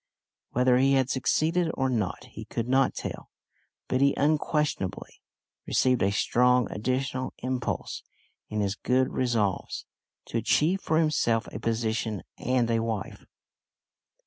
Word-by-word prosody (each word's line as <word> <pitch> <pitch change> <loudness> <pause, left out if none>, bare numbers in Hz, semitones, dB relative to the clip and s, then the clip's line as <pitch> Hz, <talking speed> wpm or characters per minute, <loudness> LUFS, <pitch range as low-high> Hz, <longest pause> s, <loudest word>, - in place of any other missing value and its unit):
Whether 125 0 +4
he 135 +1 +4
had 130 -1 +2
succeeded 160 +6 +1
or 135 - +1
not 110 -8 -1
he - - -8
could 115 0 -3
not 130 +1 +3
tell, - - -6 0.6
but 130 - 0
he 140 0 +4
unquestionably 150 - -1 0.5
received 130 -2 +2
a 100 - +3
strong 125 +3 +3
additional 130 +3 -2
impulse 130 -1 -3 0.5
in 105 0 -1
his 100 -1 0
good 125 +4 +1
resolves 115 -7 -1 0.4
to - - -2
achieve 180 +6 +2
for 160 - +1
himself 135 -8 +2
a - - -4
position 110 -2 -1 0.2
and 125 -1 +1
a 115 - +2
wife! 110 -3 -4
125 Hz, 130 wpm, -27 LUFS, 115-135 Hz, 0.6 s, Whether